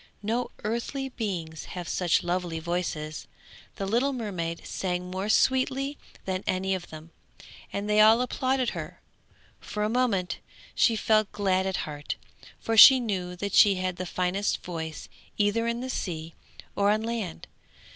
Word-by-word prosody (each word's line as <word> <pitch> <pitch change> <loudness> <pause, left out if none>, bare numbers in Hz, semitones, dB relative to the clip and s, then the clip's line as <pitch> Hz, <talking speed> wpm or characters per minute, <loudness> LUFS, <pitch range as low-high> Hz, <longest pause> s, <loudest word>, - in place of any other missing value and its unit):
No 235 +4 -1
earthly 235 +5 -2
beings 175 -10 -4
have 175 -1 -5
such 175 -3 +1
lovely 175 -1 -2
voices. 160 -2 -3 0.5
The 195 - -3
little 240 +8 +1
mermaid 180 -9 -4
sang 180 -1 -3
more 190 +3 -3
sweetly 265 +4 +2 0.3
than 190 0 -2
any 190 +1 0
of 185 -2 -4
them, 160 +1 -11 0.6
and 200 +1 -3
they 210 0 +4
all 220 +2 +7
applauded 255 0 0
her. - - -7 0.6
For 210 - -4
a 210 - +1
moment 225 -7 0 0.3
she 230 - +3
felt 215 -1 +2
glad 190 -2 +1
at 190 - -1
heart, 145 -1 -5 0.4
for 225 - -1
she 260 +4 +10
knew 185 -6 -3
that 200 +2 -4
she 205 -2 +7
had 185 -1 -2
the 185 - -4
finest 185 +3 -1
voice 160 -3 -6 0.3
either 210 +3 +2
in 235 +1 -1
the 260 - -4
sea 165 -6 -4 0.4
or 200 0 +3
on 215 +1 +2
land. 225 -7 -4
195 Hz, 155 wpm, -27 LUFS, 180-225 Hz, 0.6 s, she